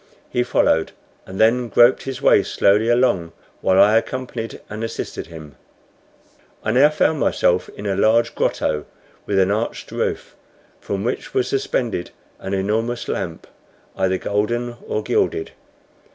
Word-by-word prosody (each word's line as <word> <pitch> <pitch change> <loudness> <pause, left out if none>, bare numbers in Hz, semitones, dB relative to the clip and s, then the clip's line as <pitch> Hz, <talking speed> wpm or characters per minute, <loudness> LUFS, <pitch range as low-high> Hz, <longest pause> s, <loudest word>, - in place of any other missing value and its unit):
He 125 - +1
followed, 80 -9 +1 0.3
and 95 +1 -8
then 120 +2 +3
groped 120 +4 +5
his 135 -2 -6
way - - +6
slowly 105 +3 +2
along, 120 -9 +2 0.3
while 95 0 +3
I 105 +3 +6
accompanied 120 -2 -4
and 110 +2 -6
assisted 115 - -5
him. 80 -4 -11 1.1
I 110 - 0
now 135 +5 +6
found 155 0 +1
myself 90 -7 +1
in 105 - -7
a 100 -1 0
large 115 +3 +3
grotto 75 -1 -1 0.4
with 100 - 0
an 95 0 +3
arched 110 +3 -3
roof, - - -3 0.4
from 100 0 -4
which 120 - -4
was 125 -1 +2
suspended 125 -8 -1 0.3
an 95 +1 -3
enormous 110 +5 -1
lamp, - - -4 0.5
either 95 0 +1
golden 120 +5 -1
or 110 - -2
gilded. 80 - 0
110 Hz, 140 wpm, -21 LUFS, 95-120 Hz, 1.1 s, way